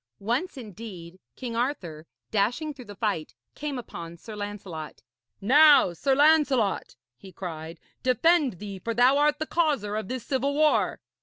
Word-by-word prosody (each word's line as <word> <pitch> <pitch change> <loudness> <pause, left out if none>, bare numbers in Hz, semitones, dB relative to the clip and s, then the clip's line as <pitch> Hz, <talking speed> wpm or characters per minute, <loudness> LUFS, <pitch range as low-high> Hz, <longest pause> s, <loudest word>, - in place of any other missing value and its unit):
Once, 245 - -2
indeed, 200 -6 -9 0.2
King 240 -3 -5
Arthur, 180 - -3 0.2
dashing 245 +9 0
through 260 -3 -12
the 205 -1 -10
fight, 195 -7 -2 0.2
came 290 -2 -4
upon 170 -8 -8
Sir 215 +5 -10
Lancelot. 200 -7 -7 0.4
'Now, 285 - +6
Sir 270 +10 +1
Lancelot,' 285 -8 +3 0.2
he 190 +10 -13
cried, 165 -2 -7 0.2
'defend 290 +1 +3
thee, 195 +1 -8
for 230 +4 -3
thou 255 +4 +5
art 295 0 +3
the 315 - -2
causer 290 -12 0
of 215 -3 -3
this 255 0 -5
civil 275 +1 0
war.' 305 0 +2
230 Hz, 150 wpm, -26 LUFS, 190-280 Hz, 0.4 s, Now